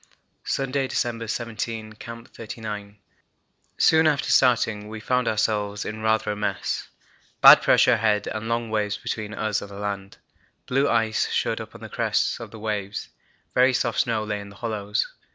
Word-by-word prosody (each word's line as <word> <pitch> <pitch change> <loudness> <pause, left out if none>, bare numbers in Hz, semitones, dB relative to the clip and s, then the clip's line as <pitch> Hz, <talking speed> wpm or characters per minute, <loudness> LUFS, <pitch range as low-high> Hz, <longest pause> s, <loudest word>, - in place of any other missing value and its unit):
Sunday, 135 0 0
December 115 -2 -2
17. 115 -1 -4
Camp 115 +2 -10
39. 105 -2 -7 0.8
Soon 160 0 +5
after 150 -2 +1
starting 110 -5 +3
we 110 0 -6
found 125 +2 0
ourselves 105 -1 0
in 110 +1 -5
rather 110 -1 +1
a - - -3
mess; 105 0 -2 0.5
bad - - +10
pressure 125 - +5
ahead 105 -2 +2
and 110 +1 -4
long 115 -1 -1
waves 105 -1 0
between 110 -1 -4
us 110 -1 -1
and 100 - -8
the 100 - -10
land. 100 -1 -5 0.5
Blue 135 +2 +1
ice 110 -2 +1
showed - - 0
on - - -11
the - - -7
crests - - 0
of - - -7
the 115 - -11
waves; 105 -2 -4 0.4
very 130 +1 +4
soft 120 -2 0
snow 115 -2 +1
lay 105 -1 -3
in 100 0 -9
the 100 - -14
hollows. 105 -2 -2
110 Hz, 165 wpm, -24 LUFS, 105-115 Hz, 0.8 s, bad